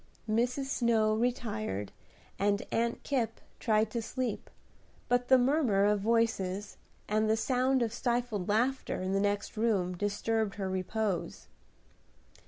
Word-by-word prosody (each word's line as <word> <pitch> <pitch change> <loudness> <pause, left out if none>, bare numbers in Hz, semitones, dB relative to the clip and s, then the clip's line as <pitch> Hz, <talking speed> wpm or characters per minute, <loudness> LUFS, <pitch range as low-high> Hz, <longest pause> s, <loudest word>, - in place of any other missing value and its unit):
Mrs. 245 +5 +1
Snow 230 -5 +2
retired, 215 - -2 0.5
and 200 0 +1
Aunt 235 +1 0
Kipp 235 -5 -1 0.2
tried 215 -2 +2
to 235 - -2
sleep; 235 0 -3 0.6
but 245 0 +1
the 260 - +7
murmur 250 -6 +3
of 210 0 +3
voices, 205 -3 0 0.3
and 215 +1 +1
the 220 - +3
sound 255 +1 +2
of 225 -1 -2
stifled 235 -6 -1
laughter 250 +6 0
in 190 +1 -1
the 195 - +2
next 205 0 -1
room 200 -5 +1
disturbed 205 +2 -1
her 195 -2 -3
repose. 190 +1 -2
220 Hz, 130 wpm, -31 LUFS, 205-245 Hz, 0.6 s, the